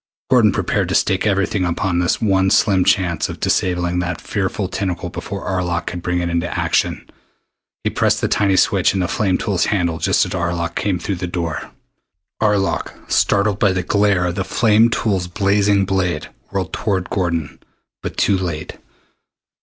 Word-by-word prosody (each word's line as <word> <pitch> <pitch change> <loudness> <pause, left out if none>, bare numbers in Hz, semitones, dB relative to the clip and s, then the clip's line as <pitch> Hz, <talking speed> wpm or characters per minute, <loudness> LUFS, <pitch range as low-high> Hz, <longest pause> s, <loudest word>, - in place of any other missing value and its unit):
Gordon 115 -5 +5
prepared - - -1
to - - 0
stake 95 +2 +2
everything 95 -1 +1
upon 90 0 0
his 90 - +1
one 95 -3 +2
slim 95 -2 +3
chance 85 -4 +1
of - - -7
disabling 90 -1 0
that 90 -1 -2
fearful 100 -1 -2
tentacle 90 -2 -3
before - - -6
Arlok 90 -2 -1
could 90 0 -5
bring 90 0 -1
it 85 - -1
into 85 0 -1
action. - - 0 0.8
He - - 0
pressed - - +1
the - - 0
tiny 100 -2 +2
switch 95 - +3
in - - 0
the 90 - 0
flame 95 -1 0
tool's 100 -6 0
handle 85 -5 0
just - - +2
as - - -7
Arlok 85 -1 -2
came 100 -3 -1
through 95 +1 -3
the 90 0 -4
door. 85 -3 -4 0.7
Arlok, 105 -3 0 0.2
startled 100 0 +2
by 100 -3 +3
the 90 -1 -1
glare 100 -1 +2
of 85 - -1
the 95 +1 -2
flame 110 +2 +3
tool's 100 -6 -1
blazing 100 +1 +2
blade, 90 -5 -1 0.2
whirled 95 -3 -3
toward 95 -4 -2
Gordon 85 -6 -2 0.4
but - - -6
too 100 -2 +2
late. 80 -4 -5
95 Hz, 170 wpm, -19 LUFS, 90-100 Hz, 0.8 s, Gordon